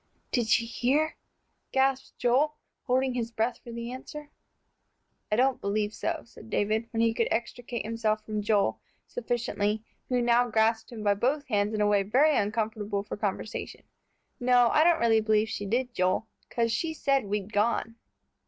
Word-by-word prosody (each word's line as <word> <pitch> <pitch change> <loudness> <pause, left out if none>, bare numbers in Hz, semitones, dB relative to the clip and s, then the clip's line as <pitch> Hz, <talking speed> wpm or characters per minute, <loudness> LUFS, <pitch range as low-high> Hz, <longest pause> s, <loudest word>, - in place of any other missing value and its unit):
"Did 240 -3 +1
she 230 +1 +3
hear?" 275 +7 +1 0.6
gasped 270 0 +1
Joel, 270 +5 +2 0.3
holding 260 0 +2
his 235 -2 -2
breath 230 +1 -1
for 240 - -9
the 235 +1 -5
answer. 290 +3 -8 1.0
"I - - +3
don't 260 +3 +2
believe 210 +1 -1
so," - - -2
said 225 -1 -14
David, 215 +2 0
when 225 -1 -1
he 230 -1 +3
could 230 0 +1
extricate 235 0 -3
himself 215 -1 -1
from 215 -1 -2
Joel 205 -1 +1 0.3
sufficiently, 220 - -2 0.3
who 250 -1 +2
now 240 0 +3
grasped 225 +1 +1
him 220 -3 -7
by 205 -1 +4
both 270 +8 0
hands 210 -1 +1
in 210 - 0
a 210 - +4
way 205 -1 +3
very 270 +10 +3
uncomfortable 210 -1 -1
for - - -6
conversation. 205 0 -4 0.6
"No, 245 -1 +4
I 305 - +4
don't 340 0 +4
really 225 -1 +4
believe 215 0 +2
she 205 -2 -4
did, 245 +4 -1
Joel, 185 +2 +1 0.2
'cause 230 -1 0
she 320 +7 -1
said 275 -5 +1
we'd 205 +1 -3
gone." 230 +2 +1
230 Hz, 170 wpm, -28 LUFS, 215-250 Hz, 1.0 s, by